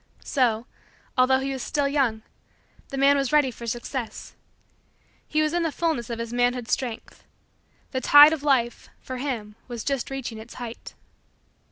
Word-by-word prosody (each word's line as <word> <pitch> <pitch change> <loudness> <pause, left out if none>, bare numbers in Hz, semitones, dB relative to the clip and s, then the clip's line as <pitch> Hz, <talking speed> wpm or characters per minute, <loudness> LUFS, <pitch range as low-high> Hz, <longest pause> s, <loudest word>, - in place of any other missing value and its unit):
So, 240 -4 +1 0.5
although 255 +1 +4
he 270 +1 -2
was 265 - -5
still 290 +1 0
young, 260 -6 0 0.7
the 275 - -5
man 275 +1 +5
was 275 -3 0
ready 295 -4 +4
for 235 0 -9
Success. 240 0 -5 0.9
He 310 0 +1
was 305 +1 0
in 345 - +1
the 325 -2 0
fullness 310 -9 -1
of 235 - -3
his 230 0 -5
manhood 245 -1 +1
strength. 240 -4 -3 0.7
The 260 - -2
tide 290 +4 +9
of 315 - -3
Life, 255 -5 +1
for 255 - -7
him, 245 -6 -4
was 240 -3 -6
just 275 -3 -2
reaching 260 -5 -5
its 225 +2 -11
height. 240 -2 -8
255 Hz, 165 wpm, -25 LUFS, 235-280 Hz, 0.9 s, tide